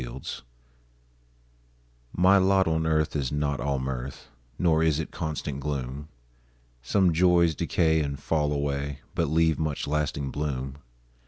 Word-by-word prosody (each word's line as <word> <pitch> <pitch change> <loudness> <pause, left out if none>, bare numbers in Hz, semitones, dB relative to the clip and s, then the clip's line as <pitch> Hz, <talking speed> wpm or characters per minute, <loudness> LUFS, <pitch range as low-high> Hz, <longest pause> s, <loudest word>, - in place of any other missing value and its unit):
MY 60 - -5
LOT 65 -1 -7 1.7
My 95 +3 +5
lot 95 -1 +3
on 80 0 +1
earth 80 -1 +1
is 70 -4 -1
not 75 -1 -1
all 70 +1 -1
mirth, 65 0 -5 0.3
Nor 80 -3 +3
is 80 -2 +2
it 80 - -4
constant 75 -4 -4
gloom; 70 0 -4 0.7
Some 90 +7 +2
joys 85 -1 +4
decay 80 +3 +1
and 70 -1 -3
fall 75 0 0
away, 70 -1 -2
But 85 - 0
leave 80 0 +2
much 75 -3 -2
lasting 70 -2 -1
bloom. 70 -2 -3
75 Hz, 140 wpm, -27 LUFS, 70-80 Hz, 1.7 s, My